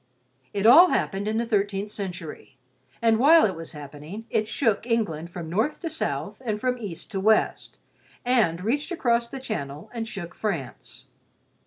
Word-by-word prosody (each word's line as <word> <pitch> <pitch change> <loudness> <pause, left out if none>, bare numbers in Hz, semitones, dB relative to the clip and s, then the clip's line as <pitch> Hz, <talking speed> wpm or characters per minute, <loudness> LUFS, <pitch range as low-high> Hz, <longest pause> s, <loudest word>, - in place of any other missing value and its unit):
It 200 0 -2
all 340 +11 +9
happened 200 +1 -1
in 220 +1 0
the 235 - 0
thirteenth 205 -2 -1
century, 180 -9 -7 0.5
and 225 -1 +4
while 315 +5 +7
it 190 -4 -1
was 165 0 -8
happening, 150 +8 -9
it 215 -1 +1
shook 225 -2 0
England 170 -9 -1
from 170 -2 -7
north 220 - 0
to 330 - -3
south 320 - -3
and 215 -3 -2
from 250 +1 -1
east 195 -8 -7
to 195 - -2
west; 215 +3 +1 0.5
and 215 -9 +2
reached 285 - -1
across 235 -8 +1
the 270 +3 -7
channel 150 - -5
and 230 -2 -4
shook 180 -6 -6
France. 170 - -5
215 Hz, 165 wpm, -25 LUFS, 175-235 Hz, 0.5 s, all